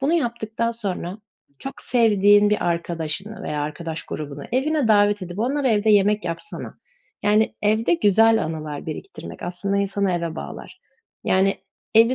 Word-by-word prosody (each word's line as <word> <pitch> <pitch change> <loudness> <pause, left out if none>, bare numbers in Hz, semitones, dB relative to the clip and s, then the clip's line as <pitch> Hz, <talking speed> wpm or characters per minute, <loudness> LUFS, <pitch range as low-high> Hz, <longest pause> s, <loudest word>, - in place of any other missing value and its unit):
Bunu 280 +5 +1
yaptıktan 235 -6 -1
sonra 200 -4 -4 0.4
çok 270 - -6
sevdiğin 205 -3 +4
bir 210 - +1
arkadaşını 170 +4 -3
veya 150 -1 -3
arkadaş 160 +2 -4
grubunu 145 -2 -6
evine 275 0 +1
davet 205 -1 +4
edip 175 +1 -7
onlara 265 +4 +1
evde 215 -1 +3
yemek 210 0 +3
yapsana. 170 - -5 0.4
Yani 210 +1 +3
evde 220 +8 +3
güzel 225 - +4
anılar 155 -2 -5
biriktirmek 385 - -8
aslında 180 +3 -2
insanı 200 -1 +1
eve 170 -2 -2
bağlar. - - -8 0.4
Yani, 190 +1 +3 0.4
evi 230 +3 +6
205 Hz, 140 wpm, -23 LUFS, 175-225 Hz, 0.4 s, evi